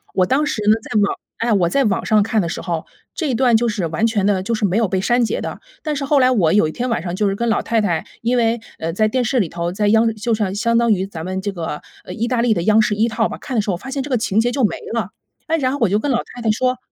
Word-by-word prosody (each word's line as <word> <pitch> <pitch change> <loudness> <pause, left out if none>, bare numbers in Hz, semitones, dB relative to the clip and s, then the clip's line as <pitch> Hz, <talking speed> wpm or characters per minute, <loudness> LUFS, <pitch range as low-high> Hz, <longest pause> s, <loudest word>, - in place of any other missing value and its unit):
我 185 - +4
当 270 +10 +1
时 290 - -2
呢 215 - +7
在 215 - 0
网 200 - +1 0.2
哎， 230 0 +1
我 180 -4 +2
在 275 +10 +2
网 200 - 0
上 215 -1 +4
看 215 0 +1
的 170 - -2
时 - - -4
候， 170 -3 -3 0.3
这 315 -5 -2
一 245 - 0
段 245 -2 +3
就 235 +1 0
是 210 -6 -2
完 165 +8 0
全 215 -4 0
的 200 -2 +2
就 230 +3 -1
是 215 - 0
没 190 -1 0
有 225 -3 +2
被 190 0 -1
删 240 +4 +2
节 - - -1
的。 - - -5 0.2
但 305 -3 -2
是 280 - -3
后 285 0 +3
来 255 0 +4
我 180 -10 +3
有 200 -6 +4
一 - - -4
天 250 +8 -3
晚 230 - 0
上 175 -1 -3
就 205 +1 +1
是 195 - -2
跟 235 +3 -2
老 - - +1
太 230 0 0
太 170 -6 -1 0.2
因 240 +2 +1
为， 230 0 +2 0.2
呃， 165 +1 -2
在 215 +3 +2
电 250 +3 0
视 255 +2 +1
里 195 - +1
头， 170 0 -3
在 205 +3 0
央 225 +1 +3
就 225 +2 -1
是 215 -1 0
啊， 190 - -1
相 230 +3 +1
当 235 -1 +3
于 190 0 -1
咱 165 -5 -7
们 185 +1 -3
这 205 - -2
个， 165 -4 -5 0.2
呃， 180 - -7
意 225 +5 -2
大 240 -1 +1
利 235 -2 +3
的 170 - -2
央 215 +3 +5
视 210 -1 +1
一 220 +3 +2
套 225 -1 0
吧， - - -6
看 260 - -6
的 215 - +3
时 205 - -5
候 180 - 0
发 265 +8 -9
现 275 - -2
这 290 - -7
个 255 - +2
情 215 -2 0
节 245 - 0
就 265 +1 -1
没 - - -1 0.2
了。 215 -4 -2 0.4
哎， 325 0 +1
然 260 -4 0
后 280 - -2
我 225 - +4
就 205 +3 +2
跟 280 +4 -1
老 240 - +2 0.2
太 245 - -7
太 225 - 0
说 250 +4 +1
哎， - - -14
220 Hz, 360 characters per minute, -19 LUFS, 195-240 Hz, 0.4 s, 呢